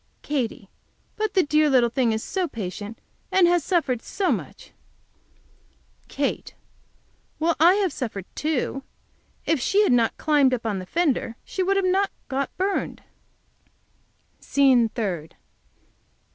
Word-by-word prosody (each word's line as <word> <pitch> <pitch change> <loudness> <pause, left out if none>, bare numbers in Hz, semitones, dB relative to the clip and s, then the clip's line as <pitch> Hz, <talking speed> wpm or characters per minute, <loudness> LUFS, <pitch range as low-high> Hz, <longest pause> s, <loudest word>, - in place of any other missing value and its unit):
Katy. 250 -8 -3 0.5
But 430 -1 -2
the 375 - +5
dear 305 +1 +3
little 245 -4 +3
thing 245 -2 +1
is 220 0 -2
so 375 -2 -2
patient 210 - -6 0.3
and 370 -2 +5
has 350 -2 +2
suffered 280 -10 0
so 385 -2 -1
much. - - -5 1.4
Kate. - - -3 0.8
Well, 330 +1 +1
I 345 +4 +6
have 390 -6 0
suffered, 205 -7 -5
too. 290 -3 -2 0.6
If 320 - +1
she 400 +11 +3
had - - +2
not 235 -2 +2
climbed 285 -4 +3
up 230 - -9
on 205 -4 -1
the 185 - -8
fender 290 - 0
she 380 - -3
would 390 +2 +2
not 385 +2 +2
have - - -42
got 275 0 -3
burned. 385 +1 -2 1.4
SCENE 260 -5 +3
THIRD. 185 -10 -4
280 Hz, 135 wpm, -24 LUFS, 230-350 Hz, 1.4 s, I